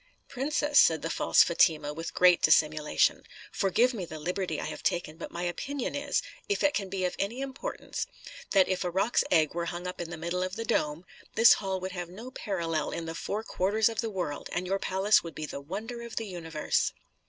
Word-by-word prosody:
"Princess," 290 Hz, +2 st, +2 dB
said 160 Hz, -1 st, +5 dB
the 165 Hz, -, -2 dB
false -, -, +5 dB
Fatima, 155 Hz, -3 st, +2 dB
with 165 Hz, +2 st, -6 dB
great 180 Hz, -1 st, +6 dB
dissimulation, 155 Hz, -, +3 dB, 0.3 s
"forgive 230 Hz, +6 st, +2 dB
me 205 Hz, -6 st, -4 dB
the 160 Hz, -2 st, -7 dB
liberty 175 Hz, 0 st, -2 dB
I -, -, -3 dB
have -, -, -6 dB
taken; 165 Hz, -3 st, -1 dB
but 165 Hz, -, -7 dB
my 175 Hz, -, -5 dB
opinion 245 Hz, +10 st, -3 dB
is, 285 Hz, 0 st, -1 dB, 0.3 s
if 410 Hz, -, 0 dB
it 295 Hz, 0 st, +4 dB
can 195 Hz, -2 st, -2 dB
be 185 Hz, -1 st, -1 dB
of 180 Hz, -, -2 dB
any 215 Hz, +6 st, -2 dB
importance, 270 Hz, 0 st, -4 dB, 0.4 s
that 195 Hz, -2 st, +4 dB
if 185 Hz, 0 st, -1 dB
a 180 Hz, -, -1 dB
roc's 195 Hz, +6 st, +2 dB
egg 155 Hz, -3 st, +3 dB
were 170 Hz, 0 st, -2 dB
hung 175 Hz, +1 st, -5 dB
up 180 Hz, -1 st, -4 dB
in 170 Hz, -, -5 dB
the 175 Hz, -, -6 dB
middle 170 Hz, +3 st, -2 dB
of 185 Hz, +1 st, -2 dB
the 230 Hz, 0 st, -4 dB
dome, 155 Hz, -6 st, 0 dB, 0.3 s
this 225 Hz, +1 st, +8 dB
hall 190 Hz, -2 st, -2 dB
would 185 Hz, +1 st, -4 dB
have 175 Hz, -2 st, -5 dB
no 225 Hz, +8 st, -9 dB
parallel 165 Hz, -, -2 dB
in 165 Hz, -, -4 dB
the 165 Hz, -, -4 dB
four 210 Hz, +6 st, -3 dB
quarters 210 Hz, +2 st, +1 dB
of 225 Hz, -2 st, -2 dB
the 225 Hz, -, -2 dB
world, 175 Hz, -8 st, -4 dB
and 175 Hz, +1 st, -1 dB
your 195 Hz, +2 st, 0 dB
palace 195 Hz, +3 st, +3 dB
would 165 Hz, -2 st, -8 dB
be 155 Hz, -, -4 dB
the 140 Hz, -, -6 dB
wonder 215 Hz, -, -6 dB
of 235 Hz, -1 st, -8 dB
the 225 Hz, -, -2 dB
universe." 165 Hz, -5 st, -1 dB
185 Hz, 220 wpm, -29 LUFS, 165-220 Hz, 0.4 s, this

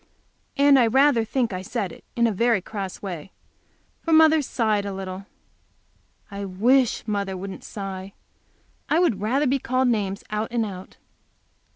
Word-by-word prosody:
And 280 Hz, -1 st, +6 dB
I 240 Hz, -, +4 dB
rather 265 Hz, 0 st, +4 dB
think 235 Hz, -1 st, -1 dB
I 185 Hz, -, -3 dB
said 205 Hz, -2 st, -3 dB
it -, -, -14 dB
in 235 Hz, -, +3 dB
a 230 Hz, -, +2 dB
very 230 Hz, +1 st, +2 dB
cross 195 Hz, 0 st, -6 dB
way, 185 Hz, -2 st, -6 dB, 0.7 s
for 330 Hz, -, -3 dB
mother 315 Hz, -1 st, +6 dB
sighed 220 Hz, -6 st, 0 dB
a 200 Hz, -, -4 dB
little. 190 Hz, +1 st, -6 dB, 1.0 s
I 200 Hz, 0 st, -5 dB
wish 235 Hz, +7 st, +2 dB
mother 200 Hz, -2 st, -2 dB
wouldn't 195 Hz, +1 st, -7 dB
sigh. 195 Hz, -1 st, -7 dB, 0.8 s
I 310 Hz, -, +3 dB
would 325 Hz, -, +2 dB
rather 260 Hz, +8 st, +1 dB
be 270 Hz, +1 st, +1 dB
called 255 Hz, +1 st, +1 dB
names 200 Hz, -4 st, -1 dB
out 215 Hz, +1 st, -1 dB
and 235 Hz, -1 st, 0 dB
out. 190 Hz, -3 st, -9 dB
215 Hz, 160 wpm, -24 LUFS, 195-255 Hz, 1.0 s, And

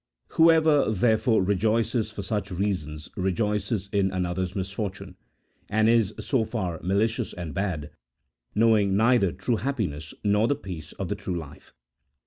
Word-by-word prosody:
Whoever, 160 Hz, -4 st, +5 dB
therefore, 110 Hz, +1 st, +2 dB
rejoices 110 Hz, +3 st, +1 dB
for 105 Hz, -2 st, -7 dB
such 105 Hz, +1 st, -2 dB
reasons, 85 Hz, -5 st, -3 dB
rejoices 105 Hz, +2 st, -1 dB
in 100 Hz, -2 st, +2 dB
another's 90 Hz, 0 st, -2 dB
misfortune, 100 Hz, +1 st, -4 dB, 0.5 s
and 110 Hz, +1 st, +3 dB
is, 115 Hz, -3 st, +3 dB
so 130 Hz, -6 st, +1 dB
far, 95 Hz, -8 st, -3 dB
malicious 110 Hz, +5 st, 0 dB
and 85 Hz, -3 st, -6 dB
bad, 90 Hz, -7 st, -3 dB, 0.6 s
knowing 105 Hz, -3 st, +4 dB
neither 115 Hz, -4 st, +4 dB
true 95 Hz, +7 st, -1 dB
happiness 95 Hz, -, -3 dB
nor 105 Hz, +2 st, +3 dB
the 145 Hz, -, +2 dB
peace 90 Hz, -, -8 dB
of 95 Hz, -, -4 dB
the 105 Hz, -, -1 dB
true 95 Hz, -3 st, -4 dB
life. 75 Hz, -3 st, -10 dB
100 Hz, 135 wpm, -26 LUFS, 90-110 Hz, 0.6 s, Whoever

